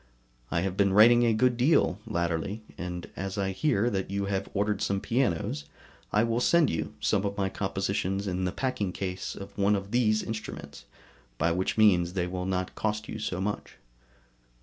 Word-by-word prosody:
I 85 Hz, -, 0 dB
have 95 Hz, 0 st, -2 dB
been 100 Hz, -1 st, +3 dB
writing 120 Hz, +3 st, +7 dB
a -, -, +4 dB
good 120 Hz, +2 st, +2 dB
deal 125 Hz, -, +3 dB
latterly, 85 Hz, +5 st, -2 dB
and 90 Hz, 0 st, -5 dB
as 95 Hz, +2 st, -4 dB
I 95 Hz, -1 st, 0 dB
hear 115 Hz, +1 st, +1 dB
that 95 Hz, -2 st, -2 dB
you 100 Hz, 0 st, -1 dB
have 100 Hz, 0 st, -2 dB
ordered 105 Hz, +1 st, 0 dB
some 100 Hz, 0 st, 0 dB
pianos 100 Hz, -, 0 dB
from, 70 Hz, -, -20 dB, 0.4 s
I 105 Hz, -, +3 dB
will 115 Hz, 0 st, +1 dB
send 170 Hz, +5 st, +4 dB
you 80 Hz, -, -3 dB
some 95 Hz, -, +1 dB
of 100 Hz, 0 st, -2 dB
my 95 Hz, -1 st, 0 dB
compositions 95 Hz, 0 st, -2 dB
in 90 Hz, -1 st, -1 dB
the 90 Hz, -, 0 dB
packing 105 Hz, -6 st, -2 dB
case 95 Hz, -1 st, -4 dB
of 100 Hz, 0 st, -9 dB
one 100 Hz, +1 st, +4 dB
of 100 Hz, 0 st, -4 dB
these 110 Hz, -3 st, +2 dB
instruments, 105 Hz, -10 st, -7 dB, 0.5 s
by 85 Hz, +5 st, +2 dB
which 90 Hz, +5 st, -1 dB
means 90 Hz, -5 st, +4 dB
they 90 Hz, -2 st, 0 dB
will 90 Hz, +1 st, -4 dB
not 90 Hz, -1 st, -2 dB
cost 105 Hz, 0 st, -2 dB
you 110 Hz, -, -6 dB
so 90 Hz, -4 st, -3 dB
much. 105 Hz, +2 st, -4 dB
100 Hz, 190 wpm, -28 LUFS, 90-110 Hz, 0.5 s, writing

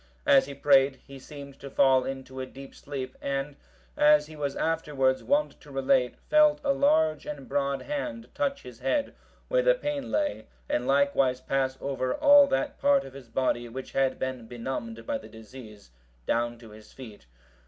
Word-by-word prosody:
As 135 Hz, -1 st, +5 dB
he 140 Hz, -, -7 dB
prayed, 135 Hz, -1 st, +4 dB
he 135 Hz, 0 st, -11 dB
seemed 140 Hz, 0 st, -11 dB
to 140 Hz, -, -8 dB
fall 130 Hz, -1 st, +4 dB
into 130 Hz, 0 st, -6 dB
a 130 Hz, -, -4 dB
deep 135 Hz, +1 st, -12 dB
sleep, 135 Hz, -2 st, -7 dB
and, 140 Hz, +1 st, -3 dB, 0.4 s
as 150 Hz, 0 st, +5 dB
he 155 Hz, +1 st, -12 dB
was 145 Hz, -2 st, -3 dB
afterwards 145 Hz, -5 st, 0 dB
wont 295 Hz, +1 st, 0 dB
to 150 Hz, -, -15 dB
relate, 135 Hz, -2 st, +1 dB
felt 300 Hz, -1 st, +5 dB
a 280 Hz, -1 st, +2 dB
large 160 Hz, -, +2 dB
and 145 Hz, -3 st, -7 dB
broad 140 Hz, 0 st, -1 dB
hand 285 Hz, -5 st, -4 dB
touch 280 Hz, -1 st, -2 dB
his 125 Hz, -2 st, -12 dB
head, 135 Hz, -, -1 dB, 0.3 s
where -, -, +2 dB
the -, -, +4 dB
pain 295 Hz, -, -4 dB
lay, 295 Hz, -, -1 dB, 0.2 s
and 125 Hz, +1 st, -1 dB
likewise 135 Hz, -2 st, +2 dB
pass 135 Hz, 0 st, -1 dB
over 135 Hz, -2 st, -2 dB
all 290 Hz, -1 st, +7 dB
that 285 Hz, +1 st, -2 dB
part 280 Hz, -1 st, +3 dB
of 135 Hz, -, -11 dB
his 135 Hz, -3 st, -11 dB
body 120 Hz, -2 st, -1 dB
which 130 Hz, +3 st, -8 dB
had 135 Hz, -1 st, +1 dB
been 130 Hz, -3 st, -4 dB
benumbed 130 Hz, -, -6 dB
by 285 Hz, -1 st, -2 dB
the -, -, -13 dB
disease, 110 Hz, -, -13 dB, 0.3 s
down 120 Hz, 0 st, 0 dB
to 115 Hz, -2 st, -14 dB
his 105 Hz, 0 st, -15 dB
feet. 110 Hz, -, -12 dB
135 Hz, 180 wpm, -27 LUFS, -, 0.4 s, all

